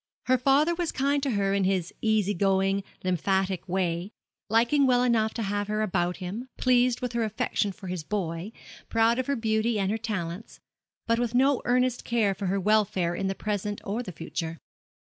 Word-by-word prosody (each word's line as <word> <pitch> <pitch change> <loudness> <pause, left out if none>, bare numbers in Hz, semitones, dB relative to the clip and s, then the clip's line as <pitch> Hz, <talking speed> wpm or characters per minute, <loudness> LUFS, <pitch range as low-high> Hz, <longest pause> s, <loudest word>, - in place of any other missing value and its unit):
Her 255 0 +3
father 280 +6 +3
was 340 -1 -2
kind 280 +1 +1
to 275 - -1
her 200 -4 +1
in 200 -1 +1
his 185 -2 0
easy 215 -2 +2
going, 195 +1 +1 0.2
lymphatic 185 0 0
way, 180 0 -1 0.4
liking 240 +6 +3
well 250 -1 +4
enough 225 -3 +2
to 230 - -2
have 205 0 -2
her 215 +1 0
about 180 -3 0
him, 200 +8 -6
pleased 250 -1 +3
with 250 -1 -3
her 235 -1 0
affection 215 -1 -1
for 190 - -12
his 180 -3 -4
boy, 175 +1 -3 0.4
proud 230 +2 +3
of 255 - -2
her 280 - +1
beauty 220 -1 0
and 195 -1 0
her 220 - -1
talents, 205 -3 -5 0.5
but 230 0 +1
with 240 -1 -1
no 270 +1 +3
earnest 250 0 +1
care 225 -4 +1
for 195 0 -4
her 195 +2 +1
welfare 195 -4 +2
in 195 +2 -2
the 195 - -2
present 205 0 -3
or 210 +5 -2
the 195 - -6
future. 165 0 -5
210 Hz, 190 wpm, -27 LUFS, 190-240 Hz, 0.5 s, well